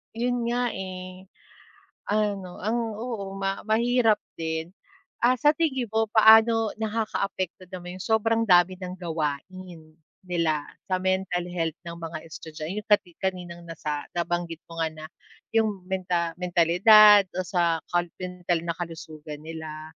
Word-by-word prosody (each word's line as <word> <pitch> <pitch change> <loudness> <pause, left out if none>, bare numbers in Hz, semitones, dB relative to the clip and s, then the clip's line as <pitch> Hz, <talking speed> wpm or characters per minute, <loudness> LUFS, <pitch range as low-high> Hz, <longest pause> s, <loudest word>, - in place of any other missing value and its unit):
'Yon 245 0 -1
nga, 240 0 0
eh. 185 0 -7 0.8
Ano, 205 -3 -1
ang 225 -1 -1
oo, 210 -5 -5
ma 195 0 -2
mahirap 230 0 +3 0.2
din. 160 +1 -3 0.5
Ah, 250 +2 +4
sa 295 +5 +4
tingin 295 -6 0
mo 220 0 +1
paano 220 0 +6
nakakaapekto 200 -4 -2
naman 180 0 -8
'yong 190 - -6
sobrang 225 +1 +2
dami 180 +1 +5
ng 180 0 -5
gawain, 165 0 -5 0.3
nila, 165 -4 0 0.2
sa 185 - +2
mental 185 -1 0
health 165 -2 -2
ng 170 0 -7
mga 165 -1 -5
estudya 155 -1 -9
'yong 210 +1 -5
kati 205 -4 +3
kaninang 180 -2 -4
nasa 150 -3 -4
nabanggit 170 -1 -2
mo 165 - -9
nga 160 - +1
na, 155 - -9 0.5
'yong 215 -4 +1
menta 180 -3 -1
mentalidad 195 +4 +7
o 185 - 0
sa 170 -3 +1
kal 175 0 +2
mental 180 -2 -2
na 170 -1 -2
kalusugan 155 -3 -7
nila. 160 -1 -7
185 Hz, 140 wpm, -26 LUFS, 170-215 Hz, 0.8 s, mentalidad